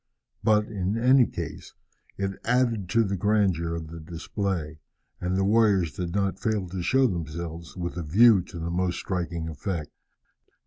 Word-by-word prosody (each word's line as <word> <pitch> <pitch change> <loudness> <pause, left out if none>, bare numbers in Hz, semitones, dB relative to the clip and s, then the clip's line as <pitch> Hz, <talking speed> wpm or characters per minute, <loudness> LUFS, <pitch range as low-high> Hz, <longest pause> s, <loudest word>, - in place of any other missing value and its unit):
But, 105 -1 +4
in 100 -1 -2
any 125 +1 +5
case, - - -7 0.4
it 95 -1 -3
added 115 -6 +1
to 115 +4 +3
the 100 -2 -1
grandeur 95 -4 +1
of 80 -1 -6
the 85 +1 -8
display, 80 -1 -4 0.4
and 90 +1 -1
the 95 - +2
warriors 100 -5 +3
did 90 0 -4
not 100 -1 0
fail 105 -4 -1
to 95 0 -4
show 130 +10 +3
themselves 85 - -4
with 85 0 -4
a - - -2
view 100 +6 +6
to - - -10
the 85 +1 -3
most 90 0 0
striking 85 -3 -3
effect. 80 0 -4
95 Hz, 165 wpm, -26 LUFS, 85-105 Hz, 0.4 s, view